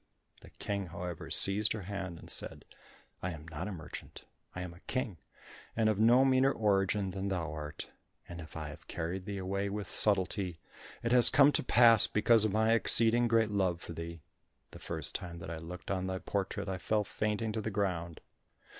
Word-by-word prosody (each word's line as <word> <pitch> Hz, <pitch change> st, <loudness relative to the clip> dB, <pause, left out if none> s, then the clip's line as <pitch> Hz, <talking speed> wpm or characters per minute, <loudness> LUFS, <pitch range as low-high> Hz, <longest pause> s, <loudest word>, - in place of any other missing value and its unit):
The -, -, -16 dB
King, 100 Hz, -2 st, -6 dB
however, 85 Hz, 0 st, -8 dB
seized 100 Hz, +2 st, +8 dB
her 110 Hz, -3 st, -7 dB
hand, 95 Hz, -3 st, -7 dB
and -, -, -14 dB
said, -, -, -5 dB, 0.6 s
"I 95 Hz, -, -4 dB
am 80 Hz, 0 st, -12 dB
not 85 Hz, +3 st, -7 dB
a -, -, -6 dB
merchant. 80 Hz, -5 st, -10 dB, 0.3 s
I 90 Hz, -, -6 dB
am 90 Hz, -1 st, -8 dB
a 85 Hz, -, -17 dB
king, 115 Hz, -, -5 dB, 0.6 s
and 110 Hz, -1 st, +1 dB
of 105 Hz, -2 st, -2 dB
no 120 Hz, +4 st, +4 dB
meaner 130 Hz, 0 st, +2 dB
origin 100 Hz, -3 st, -1 dB
than 95 Hz, +1 st, -5 dB
thou 85 Hz, -6 st, -4 dB
art, 75 Hz, -1 st, -9 dB, 0.4 s
and 85 Hz, -1 st, -9 dB
if 80 Hz, 0 st, -12 dB
I 80 Hz, -2 st, -7 dB
have 75 Hz, -, -14 dB
carried 90 Hz, +2 st, -6 dB
thee 100 Hz, -1 st, -6 dB
away 100 Hz, +1 st, -4 dB
with 105 Hz, 0 st, -6 dB
subtlety, 95 Hz, -4 st, +2 dB, 0.4 s
that 115 Hz, -, -2 dB
has 125 Hz, -1 st, +9 dB
come 140 Hz, +1 st, +4 dB
to -, -, -2 dB
pass 120 Hz, -3 st, +5 dB
because 110 Hz, +1 st, +2 dB
of 110 Hz, -, -1 dB
my 110 Hz, +2 st, +1 dB
exceeding 115 Hz, +1 st, +5 dB
great 115 Hz, -2 st, +1 dB
love 95 Hz, -4 st, -1 dB
for 85 Hz, -, -10 dB
thee. 85 Hz, -1 st, -9 dB, 0.5 s
The -, -, -13 dB
first 80 Hz, -3 st, -1 dB
time 85 Hz, -1 st, -7 dB
that 85 Hz, -1 st, -9 dB
I 85 Hz, -, -6 dB
looked 85 Hz, +4 st, -9 dB
on 95 Hz, -1 st, -3 dB
thy 95 Hz, 0 st, -4 dB
portrait, 100 Hz, +1 st, -5 dB
I 95 Hz, -1 st, -5 dB
fell 105 Hz, +3 st, -1 dB
fainting 105 Hz, +2 st, -4 dB
to 110 Hz, 0 st, -4 dB
the 110 Hz, -, -5 dB
ground." 90 Hz, -5 st, -4 dB
95 Hz, 200 wpm, -30 LUFS, 85-110 Hz, 0.6 s, has